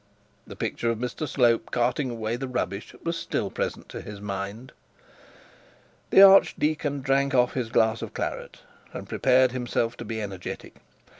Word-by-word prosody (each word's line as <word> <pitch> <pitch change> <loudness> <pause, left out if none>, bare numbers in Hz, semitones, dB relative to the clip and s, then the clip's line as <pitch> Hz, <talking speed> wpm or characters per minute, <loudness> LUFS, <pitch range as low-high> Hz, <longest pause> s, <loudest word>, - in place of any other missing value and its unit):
The - - -9
picture 115 - -2
of 115 - 0
Mr 125 +6 -4
Slope 120 -5 +2
carting 125 +3 0
away 115 -1 -3
the 135 +2 -4
rubbish 120 -5 -4
was 170 0 -1
still 165 - -3
present - - -4
to - - -7
his 105 -1 -9
mind. 100 +4 -5 1.4
The 195 - +8
archdeacon 155 -7 +4
drank 135 +1 +1
off 125 -1 +3
his 125 -4 -2
glass 110 0 +2
of - - -7
claret, - - -5 0.3
and - - -7
prepared 130 -1 +3
himself 120 -2 -1
to - - -6
be 110 +1 -4
energetic. 95 -4 -7
120 Hz, 155 wpm, -26 LUFS, 110-135 Hz, 1.4 s, The